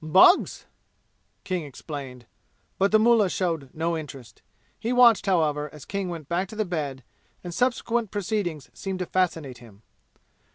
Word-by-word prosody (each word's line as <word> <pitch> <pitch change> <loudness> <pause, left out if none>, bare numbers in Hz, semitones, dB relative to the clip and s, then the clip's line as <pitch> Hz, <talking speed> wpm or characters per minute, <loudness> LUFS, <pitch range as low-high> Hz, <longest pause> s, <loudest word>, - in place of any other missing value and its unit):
"Bugs!" 185 - +5 0.8
King 185 -3 -2
explained, 135 -3 -8 0.5
but 195 +1 +3
the 215 - +7
mullah 220 -3 +4
showed 165 -8 -2
no 165 +2 -1
interest. 135 -7 -9 0.4
He 230 - -2
watched, 240 -5 +5
however, 150 -5 +1
as 150 -2 -12
King 195 -2 -3
went 165 -5 -6
back 180 +4 -1
to 220 - -9
the 215 0 0
bed, 145 -7 -4 0.4
and 175 -1 -6
subsequent 240 -1 0
proceedings 190 - -3
seemed 190 -1 -4
to 180 - -3
fascinate 165 -9 -1
him. 110 -3 -16
175 Hz, 150 wpm, -25 LUFS, 150-200 Hz, 0.8 s, the